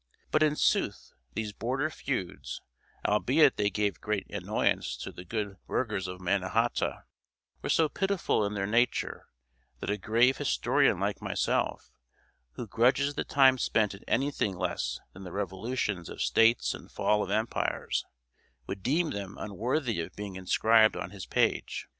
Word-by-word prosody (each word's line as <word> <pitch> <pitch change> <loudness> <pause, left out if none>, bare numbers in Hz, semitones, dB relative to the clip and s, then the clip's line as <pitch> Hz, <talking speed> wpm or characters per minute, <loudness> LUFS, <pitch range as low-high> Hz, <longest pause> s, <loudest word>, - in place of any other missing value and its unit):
But, 155 - +3
in 150 -1 +4
sooth, - - 0 0.2
these 105 -2 -3
border 130 +8 -1
feuds, 130 - -4 0.5
albeit 130 +8 +4
they 105 -1 +2
gave 105 -1 -1
great 105 -2 -1
annoyance - - 0
to - - -6
the 90 - -10
good 100 0 -4
burghers 105 -6 -1
of 90 0 -6
Mannahata, 100 +5 0 0.6
were - - -4
so 160 - +4
pitiful 195 - 0
in 105 +1 -2
their 100 -1 -1
nature, 120 +4 0 0.5
that - - -2
a 105 - -2
grave 120 +6 +3
historian 65 -2 +2
like - - -1
myself, - - -1 0.6
who 65 - -5
grudges 125 +7 +2
the - - -2
time 130 -2 +5
spent 110 -3 +1
in 100 - -12
anything 135 -9 0
less - - -2
than 95 - -10
the 90 - -8
revolutions 100 -1 -2
of - - -9
states 115 +1 +4
and - - -10
fall 105 0 +2
of - - -3
empires, 110 +2 -1 0.6
would 95 +6 -5
deem 155 - +1
them 100 -1 -5
unworthy 115 - -1
of 85 +3 -7
being 100 -2 -6
inscribed 110 +4 +4
on - - -5
his 100 -3 -8
page. - - 0
105 Hz, 155 wpm, -29 LUFS, 100-130 Hz, 0.6 s, time